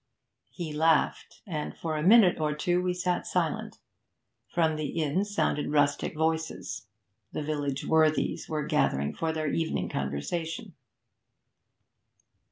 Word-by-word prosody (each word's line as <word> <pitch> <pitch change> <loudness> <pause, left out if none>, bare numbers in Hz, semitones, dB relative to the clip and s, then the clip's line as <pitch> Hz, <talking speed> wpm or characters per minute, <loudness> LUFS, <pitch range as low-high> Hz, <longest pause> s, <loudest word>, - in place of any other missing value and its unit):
He 165 -4 -6
laughed, 160 +1 +1
and 155 -6 -4
for 160 -2 -3
a 155 - -1
minute 190 0 +6
or 150 -1 0
two 175 +3 +1
we 180 0 0
sat 180 0 -1
silent. - - -1 0.7
From 160 -2 +1
the 155 -1 -2
inn 160 +5 0
sounded 205 -7 0
rustic 145 +1 +1
voices; 160 0 -2 0.5
the - - -2
village 145 -2 -2
worthies 155 -1 +2
were 155 -1 -1
gathered 70 +1 +1
for 165 -1 -1
their 155 -2 -1
evening 160 - -1
conversation. 70 - -3
155 Hz, 125 wpm, -28 LUFS, 150-170 Hz, 0.7 s, minute